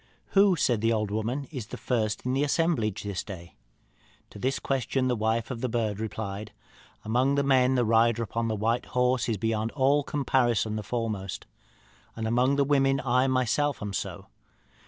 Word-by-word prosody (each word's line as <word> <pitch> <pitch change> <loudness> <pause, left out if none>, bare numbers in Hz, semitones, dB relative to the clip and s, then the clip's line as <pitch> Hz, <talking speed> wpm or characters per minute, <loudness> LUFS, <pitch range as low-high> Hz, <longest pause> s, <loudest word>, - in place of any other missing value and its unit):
'Who,' 195 -1 +5
said 120 -8 +1
the 115 +1 +2
old 105 -2 0
woman, 115 +6 -2
'is 125 -8 -6
the - - -7
first 110 -3 -1
in 125 - 0
the 135 +2 +1
assemblage 145 - 0
this 100 -2 -3
day?' 85 -4 -9 0.8
To - - -11
this 130 +5 0
question 135 -1 -1
the 125 - +1
wife 110 +2 -1
of 120 -2 -5
the 130 - -1
bird 110 -3 -1
replied, 105 -1 -5 0.5
'Among 125 +5 +2
the 140 - +2
men, 130 -1 +3
the 125 -2 +2
rider 115 +1 +3
upon 115 +2 -2
the 110 - -1
white 115 +3 0
horse 125 0 +2
is 110 - 0
beyond 110 +1 -1
all 140 +1 +3
comparison 120 -7 +1
the 110 - -2
foremost. 105 -3 -4 0.7
Among 120 +4 +1
the 140 - +3
women, 135 -1 +2
I 125 0 +2
myself 130 +3 +1
am 105 -1 -5
so. - - -4
120 Hz, 175 wpm, -27 LUFS, 110-130 Hz, 0.8 s, Who